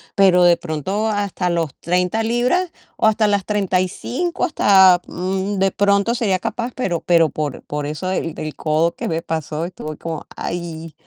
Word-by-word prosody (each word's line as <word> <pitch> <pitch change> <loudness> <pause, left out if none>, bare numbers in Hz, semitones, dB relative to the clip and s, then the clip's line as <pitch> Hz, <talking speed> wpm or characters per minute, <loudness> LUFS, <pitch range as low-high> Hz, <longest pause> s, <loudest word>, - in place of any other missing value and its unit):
pero 185 -2 +5
de 175 -1 +6
pronto 180 +7 -2
hasta 200 -4 -1
los 165 -4 -1
30 180 +5 0
libras 250 +10 +1 0.3
o 220 - +3
hasta 215 0 +3
las 200 -2 +1
35 210 - -1
hasta, 190 - +5
mm, 190 +2 -2
de 195 0 +2
pronto 200 +3 +2
sería 210 -6 +1
capaz, 240 +5 -4
pero 175 -10 -1
pero 165 -3 +3
por 150 -2 -4
por 150 0 -4
eso 155 +5 -4
del 165 -4 -2
del 155 -1 -5
codo 160 +2 +1
que - - -4
me 165 0 -1
pasó 160 -1 -3
estuve 155 -4 -7
como, 165 -2 -6
ay, 165 -2 -5
185 Hz, 170 wpm, -20 LUFS, 165-205 Hz, 0.3 s, de